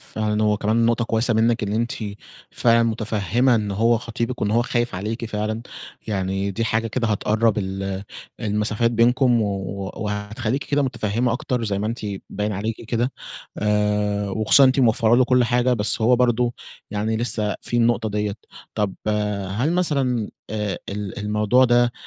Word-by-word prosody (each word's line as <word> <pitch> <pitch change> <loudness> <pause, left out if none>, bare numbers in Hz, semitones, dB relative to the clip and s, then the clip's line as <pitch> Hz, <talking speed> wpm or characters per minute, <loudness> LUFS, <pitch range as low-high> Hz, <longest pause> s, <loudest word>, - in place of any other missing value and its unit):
فعلًا 110 0 -2
هو 105 -1 +2
كمان 110 +3 +1
نقطة 120 0 +1
كويسة 115 +1 +1
منِك 115 +1 +2
إن 100 - -2
أنتِ، 115 +3 0 0.6
فعلًا 115 -1 +3
متفهّمة 115 +2 +1
إن 105 -2 0
هو 115 +3 +2
خطيبك 115 +1 -4
وإن 105 - +1
هو 115 +2 +3
خايف 120 -2 -1
عليكِ 110 +5 -4
فعلًا، 110 +1 -3 0.4
يعني 95 -1 -1
دي 115 +4 -2
حاجة 110 0 0
كده 115 +1 -1
هتقرب 110 +1 +1
ال 95 0 -3 0.4
المسافات 105 +1 0
بينكم 120 0 +3
و 105 - 0 0.5
وهتخلّيكِ 110 +4 -3
كده 145 0 +1
متفهّمة 120 -2 -1
أكتر 125 -1 -2
زي 100 -2 -1
ما 105 - -2
أنتِ 115 +2 -3 0.3
باين 105 +1 -2
عليكِ 110 +4 -4
كده، 120 +2 0 0.5
آآ 105 -1 0
وخصوصًا 110 +7 +4
إن 130 - +7
أنتِ 135 +1 +2
موفّرة 115 -1 +4
له 130 - +5
كل 125 0 +3
حاجة 125 +1 +2
بس 110 -1 +1
هو 120 +2 +5
برضه، 120 -1 +2 0.4
يعني 105 +2 -1
لسه 110 -3 -1
فيه 120 - -1
النقطة 115 -1 +2
ديّة، 105 -1 -1 0.4
طب 105 -3 -1 0.6
هل 145 +7 +1
مثلًا 135 - 0 0.2
آآ 105 -2 -2
ال 100 -1 -5
الموضوع 105 +4 +2
ده، 120 -1 +3
110 Hz, 165 wpm, -22 LUFS, 105-120 Hz, 0.6 s, إن